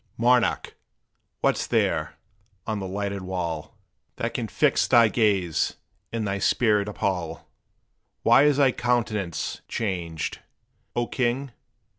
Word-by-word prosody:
Monarch! 120 0 +2 0.7
what's - - +1
there, 75 0 0 0.5
on 110 -2 -2
the 95 - -4
lighted 100 +1 -3
wall, 85 -5 -4 0.4
That - - -3
can - - -2
fix - - +2
thy 115 -2 +6
gaze 100 -8 +1 0.4
and 115 -2 -2
thy 100 0 -1
spirit 105 0 +2
appall? 90 -5 -3 0.8
Why 140 - +6
is 145 -2 +4
thy 135 -3 +5
countenance 110 -8 -1
changed, 90 -7 -3 0.6
O 120 - +1
king? 130 +2 -1
100 Hz, 115 wpm, -25 LUFS, 90-120 Hz, 0.8 s, thy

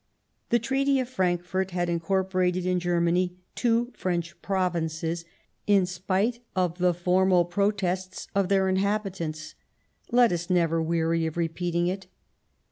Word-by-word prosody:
The 235 - +4
Treaty 270 +3 +1
of 255 - -1
Frankfort 185 -4 -1
had 175 -1 -1
incorporated 185 +1 0
in 180 0 +1
Germany 175 +1 +1 0.2
two 240 0 +1
French 175 -1 -3
Provinces 170 -3 -1 0.4
in 200 -3 +5
spite 190 +6 -1 0.2
of 180 -1 0
the 180 -1 +3
formal 180 0 +3
protests 185 0 -1
of 195 -2 +1
their 195 -1 +3
inhabitants; 190 -5 -1 0.6
let 240 -1 +5
us 175 0 -3
never 165 -2 +2
weary 165 0 +1
of 160 - -6
repeating 170 +1 -1
it. 185 +1 -3
180 Hz, 125 wpm, -26 LUFS, 170-195 Hz, 0.6 s, in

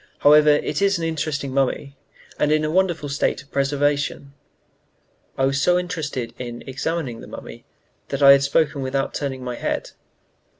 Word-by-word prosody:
However, 150 +1 +6
it 150 +6 +1
is 200 -1 +3
an 170 - -4
interesting 155 -4 -2
mummy, 140 +1 -1 0.4
and 150 - +2
in 155 0 +2
a 155 - -1
wonderful 175 -4 +1
state 140 -1 -1
of 140 - -28
preservation." 140 0 -1 1.0
I 135 - +2
was 135 +1 0
so 180 +2 +4
interested 160 -9 -4
in 120 -1 -6
examining 135 -2 -3
the - - -11
mummy - - -10 0.4
that 140 0 -2
I 140 - +10
had 140 0 +6
spoken 140 +1 +1
without 135 +1 -2
turning 135 -3 -4
my 125 -1 -5
head. - - -3
140 Hz, 165 wpm, -22 LUFS, 135-155 Hz, 1.0 s, I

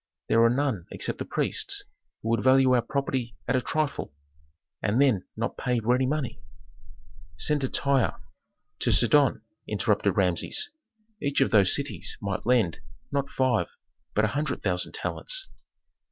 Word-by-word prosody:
There 115 +1 +5
are 115 - +6
none 125 -8 -1
except - - -3
the - - -3
priests, - - -1 0.4
who 110 - -2
would 115 -2 +1
value 130 0 +5
our 125 - +4
property 130 -2 -2
at 125 - +2
a 130 - +2
trifle, 150 - -2 0.7
and 105 +5 +1
then 130 -10 +3
not - - -2
pay 125 -1 0
ready 125 +3 +2
money." 135 -5 -2 1.0
"Send 150 - +1
to 130 - 0
Tyre, 140 -3 +2 0.6
to - - +1
Sidon," - - +4 0.2
interrupted - - +1
Rameses. 90 - +1 0.5
"Each 140 -1 0
of 135 - +3
those 100 -4 +5
cities - - -3
might 100 +1 -3
lend, 115 -9 +2 0.3
not 140 -1 -1
five, 130 -1 +1 0.5
but 110 - +4
a - - 0
hundred 145 0 -2
thousand 90 -2 -1
talents." - - -2
125 Hz, 150 wpm, -27 LUFS, 110-140 Hz, 1.0 s, are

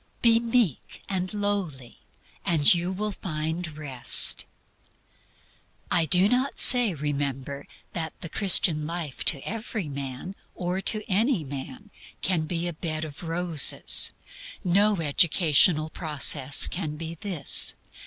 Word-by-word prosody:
Be 230 -1 +4
meek 230 - -2
and 185 -2 -4
lowly, 200 - -5 0.4
and 155 -4 +4
you 175 +1 -3
will 210 +3 -4
find 160 -2 -5
Rest." 135 -5 +4 1.5
I 165 -2 +2
do 180 +5 +4
not 255 +5 -1
say, 245 -7 +5
remember, 140 -1 -5 0.3
that 160 -2 -5
the - - -6
Christian 165 -4 +1
life 165 -5 -4
to 140 -4 +1
every 220 -4 -5
man, 140 +5 -7 0.2
or 180 +2 -4
to 215 +2 +1
any 215 - 0
man, 140 +8 -10 0.3
can 170 -4 -1
be 170 +1 -3
a 175 - -5
bed 155 -1 -5
of 155 +3 -11
roses. 170 -3 +2 0.5
No 200 +2 +1
educational 155 0 +2
process 145 -4 +2
can 155 -4 -5
be 165 +1 -7
this. 170 - +3
170 Hz, 125 wpm, -25 LUFS, 150-195 Hz, 1.5 s, say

